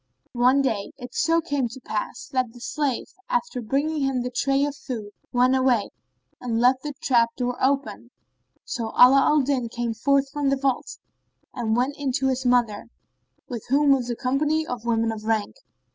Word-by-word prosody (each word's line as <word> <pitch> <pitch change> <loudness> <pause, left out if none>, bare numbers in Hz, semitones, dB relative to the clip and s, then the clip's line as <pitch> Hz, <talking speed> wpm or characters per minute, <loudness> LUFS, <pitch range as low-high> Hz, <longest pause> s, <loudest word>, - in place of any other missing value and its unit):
One 255 +3 +3
day 215 -7 -2
it 250 -2 -9
so 330 +2 +2
came 285 -6 -1
to 240 +3 -10
pass 215 -4 -4
that 255 -3 0
the 245 - -13
slave, 275 +1 -2 0.2
after 480 - -1
bringing 285 +6 -1
him 270 -2 0
the 250 - -4
tray 275 +3 +1
of 290 -1 -4
food 225 -8 -6 0.2
went 250 +1 +3
away 255 -5 +2 0.5
and 230 -2 -2
left 255 +2 +4
the 295 0 -5
trap 230 -3 +3
door 245 -1 -2
open: 275 +1 0 0.6
so 230 - -3
Ala 260 +2 +8
al 300 +1 +4
Din 255 -3 -1
came 240 -1 -3
forth 275 +4 +2
from 290 -1 0
the 275 - +1
vault 265 -2 -2 0.6
and 230 -2 -1
went 260 +4 0
in 280 -2 -1
to 265 +1 +1
his 260 0 -1
mother, 240 -4 +2 0.6
with 235 -4 -7
whom 285 +2 +4
was 255 -3 +2
a 240 - -1
company 295 +6 0
of 245 -4 -6
women 230 -1 +1
of 215 -1 -7
rank. 220 -2 -1
255 Hz, 185 wpm, -24 LUFS, 240-275 Hz, 0.6 s, Ala